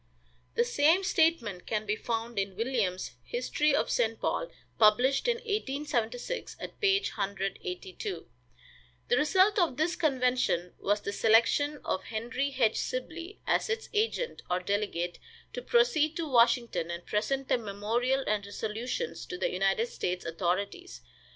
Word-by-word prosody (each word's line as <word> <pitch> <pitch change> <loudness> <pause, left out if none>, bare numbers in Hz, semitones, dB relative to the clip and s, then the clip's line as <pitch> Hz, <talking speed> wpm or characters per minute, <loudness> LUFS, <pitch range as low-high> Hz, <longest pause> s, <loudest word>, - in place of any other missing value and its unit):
The 470 - +4
same 360 -5 +3
statement 315 - +1
can 215 -1 -1
be 210 0 0
found 230 -1 -3
in 195 -1 -2
Williams' 220 -5 -1
"History 305 - +1
of - - 0
St. 225 -2 +1
Paul," - - -1 0.3
published 245 - +4
in 480 - +3
1876, 295 - -3
at - - -8
page 395 -1 +3
182. 195 - -4 0.8
The 475 - +4
result 380 +7 +4
of 335 -8 +1
this 330 +3 +1
convention 250 - +1
was 205 +1 +1
the 200 - -4
selection 235 +8 +3
of 190 - -1
Henry 240 +5 -2
H. 225 -4 +3
Sibley 335 +9 -5
as - - +1
its 450 0 -2
agent 455 +3 0
or 180 0 +1
delegate, 180 -2 -2 0.3
to - - -4
proceed 410 -12 +3
to 335 -2 -2
Washington 235 - +3
and 170 +1 -5
present 270 +6 -1
the - - +2
memorial 230 +6 0
and 210 -1 0
resolutions 225 - -4
to 360 - -5
the - - 0
United 195 +4 +1
States 180 -6 -3
authorities. 185 - -2
245 Hz, 140 wpm, -30 LUFS, 205-330 Hz, 0.8 s, The